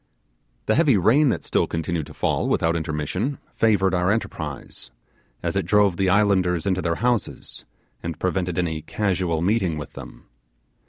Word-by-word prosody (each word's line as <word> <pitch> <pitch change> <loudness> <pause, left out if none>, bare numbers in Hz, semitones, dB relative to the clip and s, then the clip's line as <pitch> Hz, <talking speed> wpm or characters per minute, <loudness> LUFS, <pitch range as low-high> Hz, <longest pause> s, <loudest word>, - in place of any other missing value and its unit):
The 110 - +2
heavy 140 -4 +4
rain 130 - +4
that - - -1
still - - +1
continued 80 -2 -3
to - - -13
fall - - 0
without 85 0 +1
intermission 80 - -2 0.2
favoured 100 -4 +2
our 90 0 +1
enterprise, 110 +3 -4 0.5
as - - -1
it - - 0
drove 105 -3 +4
the 95 0 +2
islanders 95 -4 +2
into 95 -2 +1
their 85 -2 0
houses, 120 -4 -2 0.4
and 85 -2 -5
prevented 90 -2 -1
any 80 -3 -1
casual 90 -2 -1
meeting 95 -5 +1
with 75 - -7
them. - - -11
90 Hz, 155 wpm, -23 LUFS, 85-105 Hz, 0.5 s, heavy